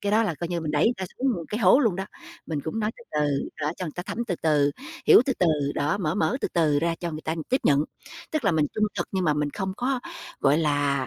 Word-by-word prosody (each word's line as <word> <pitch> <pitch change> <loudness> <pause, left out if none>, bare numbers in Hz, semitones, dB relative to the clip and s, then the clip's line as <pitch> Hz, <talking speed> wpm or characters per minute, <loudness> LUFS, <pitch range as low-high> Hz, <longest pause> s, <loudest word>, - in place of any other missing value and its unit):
Cái 205 - -1
đó 220 +2 +5
là 205 -7 -1
coi 170 +3 -5
như 175 -1 -2
mình 155 -2 -3
đẩy 150 0 +2
người 230 - +4
ta 190 - -4
xuống 270 - +1 0.2
cái 215 - -3
hố 190 +4 +6
luôn 220 -10 +2
đó. 190 - -2 0.4
Mình 155 -3 -2
cũng 160 +8 -3
nói 210 0 0
từ 235 - -15
từ, 145 -2 0
đó, 150 +1 0
cho 185 - -4
người 155 - -6
ta 175 - -3
thấm 235 +6 -4
từ 180 - -1
từ, 150 -3 +3 0.4
hiểu - - +8
từ 270 - +2
từ, 180 - +3 0.3
đó, 150 +7 0
mở 155 -5 -1
mở 210 +4 +1
từ - - -1
từ 155 -4 +3
ra 165 +2 0
cho 175 - -2
người 155 -1 -6
ta 160 - -1
tiếp 260 - +2
nhận. 145 +1 +4 0.5
Tức 310 -5 -1
là 200 - +3
mình 155 -2 +2
trung 215 - +2
thực - - -2
nhưng 190 -2 0
mà 150 -3 +3
mình 150 0 -1
không 190 +3 -3
có, 255 +1 -1 0.4
gọi 140 +2 +4
là, 145 -3 +1
170 Hz, 280 wpm, -25 LUFS, 150-205 Hz, 0.5 s, hiểu